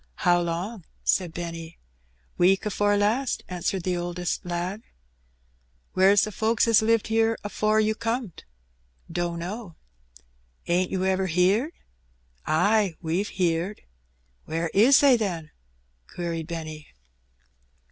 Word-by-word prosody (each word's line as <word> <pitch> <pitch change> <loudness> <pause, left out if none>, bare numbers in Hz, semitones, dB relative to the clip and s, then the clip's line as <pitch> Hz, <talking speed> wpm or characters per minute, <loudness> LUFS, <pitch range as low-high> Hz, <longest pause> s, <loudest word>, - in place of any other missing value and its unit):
How 175 0 +5
long?" 175 +5 -4 0.2
said 180 -3 +1
Benny. 165 -1 -7 0.6
"Week 190 +3 +3
afore 205 0 +1
last," 225 +6 0
answered 180 0 -2
the 180 0 0
oldest 175 0 -3
lad. 175 +4 -3 1.1
"Where's 195 +2 +5
the 215 - -2
folks 220 +2 +1
as 225 -2 +5
lived 225 0 +1
'ere 225 0 +2
afore 215 +1 +1
you 215 0 +2
comed?" 230 -3 -4 0.4
" 60 0 -22
Dunno." 175 +3 -4 0.9
"Ain't 180 +1 +1
you 190 0 -1
ever 190 0 +1
heerd?" 190 - +2 0.7
"Ay, 190 +3 +2
we've 175 +5 -1
heerd." 180 +2 -1 0.6
"Where 165 +1 -2
is 250 +9 +6
they, 275 -4 +6
then?" 170 -8 -3 0.6
queried 165 -2 -4
Benny. 155 -3 -6
185 Hz, 115 wpm, -25 LUFS, 170-215 Hz, 1.1 s, is